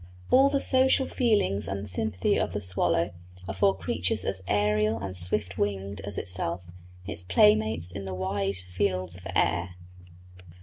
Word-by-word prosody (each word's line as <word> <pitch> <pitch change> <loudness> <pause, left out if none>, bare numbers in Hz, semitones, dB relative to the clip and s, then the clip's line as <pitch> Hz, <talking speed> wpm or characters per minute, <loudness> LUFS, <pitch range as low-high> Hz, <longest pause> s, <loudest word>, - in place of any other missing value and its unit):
All 270 +2 +6
the 280 0 +1
social 265 0 +3
feelings 210 - +1
and 100 +1 -4
sympathy 95 0 0
of - - -1
the - - -1
swallow 90 -1 0 0.4
are 95 - -3
for 95 0 +2
creatures 90 -1 -1
as 95 -1 -1
aërial 105 +2 +1
and 95 -2 -5
swift 90 +1 0
winged 100 0 -2
as 100 -1 -4
itself 90 -1 -1 0.4
its 85 - -4
playmates 105 -1 +3
in 100 +2 -6
the 95 -1 -4
wide 95 +1 -1
fields 90 0 -1
of 90 - -10
air. 90 +2 +1
95 Hz, 150 wpm, -27 LUFS, 90-105 Hz, 0.4 s, All